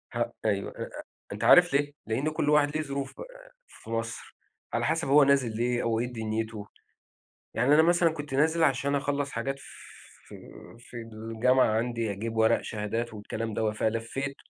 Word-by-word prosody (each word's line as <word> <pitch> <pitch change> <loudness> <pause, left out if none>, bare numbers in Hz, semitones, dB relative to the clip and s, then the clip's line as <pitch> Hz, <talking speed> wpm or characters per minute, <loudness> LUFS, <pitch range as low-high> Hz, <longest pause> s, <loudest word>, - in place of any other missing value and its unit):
ه 120 0 -1
أيوه، 100 -2 0
إ - - -11
أ - - -8 0.3
أنت - - -6
عارف - - +7
ليه؟ 145 +1 +1 0.2
لإن 130 +7 0
كلّ 155 -1 -1
واحد 150 0 +3
ليه - - 0
ظروف 140 -1 -5
آآ - - -12 0.2
في 110 - -15
مصر، 115 0 -4 0.4
على - - 0
حسب - - 0
هو 145 +1 +6
نازل 135 -5 +2
ليه 120 +1 0
أو 115 -1 0
إيه 120 - 0
دنيته، 110 -1 -4 0.9
يعني 125 +6 +3
أنا 160 - +6
مثلًا 170 0 +4
كنت 145 -3 -6
نازل 160 +4 +2
عشان 140 0 +1
أخلَّص 140 0 -1
حاجات 135 0 -3
ف - - -14 0.6
في - - -10 0.4
في 120 - -13
الجامعة 115 +3 +1
عندي 115 -2 -2
أجيب 115 +3 -5
ورق 110 0 +4
شهادات 110 +2 -3
والكلام 110 +1 -5
دوّة، 110 0 0
فلَفّيت 115 +6 -2
125 Hz, 175 wpm, -28 LUFS, 115-145 Hz, 0.9 s, عارف